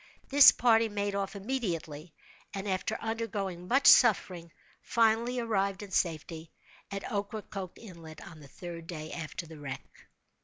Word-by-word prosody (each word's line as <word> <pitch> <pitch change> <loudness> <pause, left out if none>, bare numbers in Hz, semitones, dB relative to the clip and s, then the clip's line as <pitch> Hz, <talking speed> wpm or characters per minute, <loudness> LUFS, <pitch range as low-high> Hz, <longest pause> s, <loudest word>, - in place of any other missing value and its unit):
This 285 0 +9
party 225 -2 +3
made 205 -1 -2
off 200 +1 -3
immediately, 180 - -4 0.4
and, 195 +1 -4
after 190 +3 -1
undergoing 205 -6 -4
much 270 +6 +2
suffering, 185 -8 +5 0.3
finally 230 +2 +1
arrived, 200 -4 -1
in 200 - -10
safety, 160 -2 -2 0.4
at 195 0 -5
Ocracoke 200 -2 -5
Inlet, 165 -7 -12
on 165 -2 -12
the 145 - -13
third 170 +2 -9
day 155 -2 -7
after 165 0 -6
the 160 -1 -12
wreck. 135 -2 -9
195 Hz, 140 wpm, -30 LUFS, 165-220 Hz, 0.4 s, This